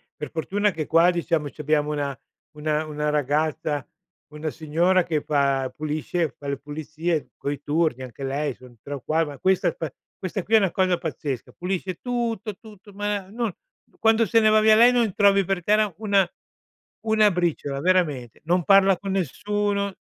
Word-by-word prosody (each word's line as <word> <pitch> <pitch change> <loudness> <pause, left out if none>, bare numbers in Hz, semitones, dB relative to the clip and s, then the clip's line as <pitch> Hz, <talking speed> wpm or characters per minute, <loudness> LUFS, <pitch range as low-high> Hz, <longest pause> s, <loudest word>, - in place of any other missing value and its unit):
Per 150 - -6
fortuna 200 +5 0
che 155 -3 -4
qua, 165 +2 +5
diciamo, 165 -4 -1
c'abbiamo 150 0 0
una 140 -2 -2 0.4
una 150 +1 -1
una 150 0 -2
ragazza, 150 0 -1 0.5
una 155 +1 -4
signora 170 +5 +2
che 155 -3 -1
fa 140 -3 +1
pulisce 155 +2 -2
fa 145 - -9
le 140 0 -1
pulizie, 155 +3 -3
coi 140 -1 -4
turni 150 -3 0
anche 130 +2 -9
lei 140 +1 -1
son 125 -1 -16
3 145 - -7
o 135 - -8
qua 160 +4 +1
ma 145 -2 -8
questa 190 0 +2
qua 160 -4 -4 0.3
questa 185 +1 -4
qui 225 - +2
è - - +9
una 195 -5 +2
cosa 185 -1 +2
pazzesca, 145 -6 -5
pulisce 185 0 -3
tutto, 235 -4 -2
tutto, 210 -2 -15
ma 205 -1 -2
non 230 0 -2 0.5
quando 225 0 +4
se 225 +2 +3
ne 215 -1 +4
va 215 0 +5
via 215 0 +6
lei, 235 +3 +7
non 235 -5 +1
trovi 200 -1 +5
per 185 -1 -2
terra 210 +2 +3
1- 200 -3 +2 0.8
1 215 -2 +4
briciola, 160 -5 -1
veramente. 155 -10 +1
Non 175 +1 +2
parla 195 0 +5
con 195 +2 -5
nessuno, 200 +3 -1
170 Hz, 175 wpm, -24 LUFS, 150-200 Hz, 0.8 s, è